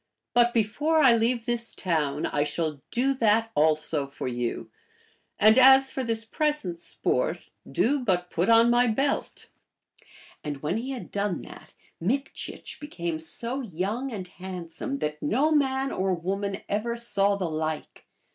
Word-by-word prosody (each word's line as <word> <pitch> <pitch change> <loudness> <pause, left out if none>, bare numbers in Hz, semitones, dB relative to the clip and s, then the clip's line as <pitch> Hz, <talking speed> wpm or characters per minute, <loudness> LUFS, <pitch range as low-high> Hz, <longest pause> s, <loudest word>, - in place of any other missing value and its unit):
But 240 0 +5
before 245 +9 +1
I 265 -6 +6
leave 230 +1 0
this 240 -1 -1
town 150 -5 -1
I 145 - 0
shall 150 -1 -3
do 260 +3 +1
that 225 -2 +2
also 155 -1 +1
for 135 - -6
you; 120 -1 -3 0.7
anil 220 +4 +6
as 265 +1 +7
for 265 - -3
this 225 -1 -2
present 260 - -1
sport, - - -2 0.2
do 285 +4 +2
but 180 -7 0
put 175 +5 0
on 230 +1 +6
my 245 +1 +4
belt." 270 +5 -1 0.9
And 145 -2 -5
when 160 +7 0
he 245 +4 -4
had 260 -3 -6
done 200 -3 -2
that, - - -13 0.3
Mikchich 265 +11 -3
became 170 - -4
so 235 +11 -3
young 215 +6 -3
and 190 -5 -5
handsome 185 +6 -6
that 150 - -3
no 265 - +2
man 270 -2 +1
or 190 0 0
woman 195 +3 -3
ever 235 +3 -1
saw 205 -4 +2
the 195 -2 -2
like. 155 0 -4
215 Hz, 150 wpm, -26 LUFS, 170-250 Hz, 0.9 s, as